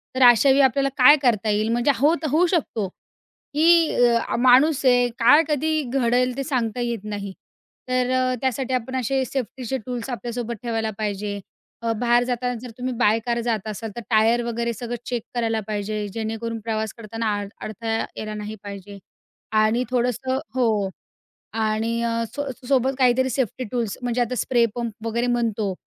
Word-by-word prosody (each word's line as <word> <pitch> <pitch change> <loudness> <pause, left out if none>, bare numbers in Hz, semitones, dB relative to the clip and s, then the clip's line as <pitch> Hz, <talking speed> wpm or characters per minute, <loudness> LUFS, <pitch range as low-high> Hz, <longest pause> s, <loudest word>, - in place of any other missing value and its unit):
तर 260 - +3
अशावेळी 265 +3 +6
आपल्याला 275 +1 +3
काय 270 +3 +8
करता 225 -5 +2
येईल, 210 +1 +1
म्हणजे 240 +4 +3
होत 305 +4 +2
होऊ 325 +5 +4
शकतो, 275 - -1
की 330 - 0
अ, 240 -1 +2
माणूस 265 +4 +5
आहे 245 -1 +5
काय 250 +7 +6
कधी 310 +1 0
घडेल, 250 -1 +2
ते 275 - -1
सांगता 250 -5 -1
येत 235 -4 -2
नाही. 205 -2 -5 0.6
तर 255 0 +1
अ, 255 0 +2
त्यासाठी 260 0 -1
आपण 255 +1 -2
असे 260 +1 0
सेफ्टीचे 255 0 -4
टूल्स 245 0 -4
आपल्यासोबत 240 0 -4
ठेवायला 225 -2 -1
पाहिजे. 205 -1 -3 0.4
अ, 230 0 0
बाहेर 240 0 +3
जाताना 245 0 -2
जर 250 - -8
तुम्ही 255 0 -3
बाय 220 -1 +4
कार 235 -1 0
जात 225 -3 -2
असाल 215 +1 -5
तर, 235 - -5
टायर 225 +1 +3
वगैरे 235 0 -2
सगळं 240 +2 -5
चेक 240 -3 -3
करायला 225 -2 0
पाहिजे, 210 0 -3
जेणेकरून 225 +1 -4
प्रवास 220 0 -3
करताना 225 -1 -2
अड 200 -1 -6
अडथळा 225 +1 -4 0.2
यायला 215 0 -5
नाही 210 0 -6
पाहिजे. 200 0 -8 0.6
आणि 220 +2 +3
थोडंसं 250 +1 0 0.2
हो. 220 -6 +1 0.6
आणि 225 +1 -1
अ, 230 0 0
सो 285 -1 -3 0.2
सोबत 265 -1 +2
काहीतरी 260 0 +3
सेफ्टी 255 0 -2
टूल्स 235 -5 -2
म्हणजे 245 0 -1
आता 245 +1 0
स्प्रे 240 -1 +2
पंप 235 -2 -3
वगैरे 235 +2 0
म्हणतो. 225 -5 0
235 Hz, 165 wpm, -23 LUFS, 220-255 Hz, 0.6 s, काय